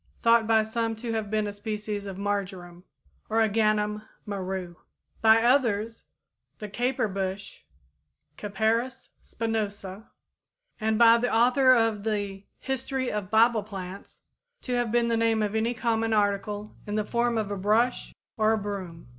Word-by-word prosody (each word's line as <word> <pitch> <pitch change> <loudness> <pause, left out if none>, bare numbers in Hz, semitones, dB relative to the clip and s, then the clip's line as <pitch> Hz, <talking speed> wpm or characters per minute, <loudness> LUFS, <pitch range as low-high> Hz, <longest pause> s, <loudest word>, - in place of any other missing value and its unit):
thought 230 -1 +4
by 220 -1 +4
some 225 +1 -2
to 230 +1 -4
have 220 -2 -2
been 215 0 0
a 205 - -4
species 210 0 -4
of 190 -1 -6
marjoram 190 -3 -4 0.5
(Origanum 215 -1 +1 0.2
maru); 190 -3 -4 0.5
by 225 0 +6
others, 230 -4 +1 0.5
the 210 - -6
caper 240 +3 -1
bush 195 0 -4 0.8
(Capparis 220 +5 -1
spinosa); 210 -3 -4 0.7
and 220 0 +1
by 230 0 +7
the 245 +1 0
author 255 +3 +5
of 225 -3 +1
the 205 -3 -3 0.2
'History 265 0 -2
of 210 -3 -3
Bible 225 +1 +4
Plants,' 195 -2 -9 0.4
to 250 - -3
have 240 -2 0
been 240 0 +2
the 230 - +1
name 225 -1 +2
of 205 0 -2
any 225 +2 0
common 225 -1 0
article 205 0 -1
in 205 - -3
the 215 -1 0
form 235 +1 0
of 210 -2 -2
a - - -1
brush 215 +6 +1 0.3
or 220 0 +3
a - - +1
broom." 195 - -6
215 Hz, 145 wpm, -27 LUFS, 205-230 Hz, 0.8 s, by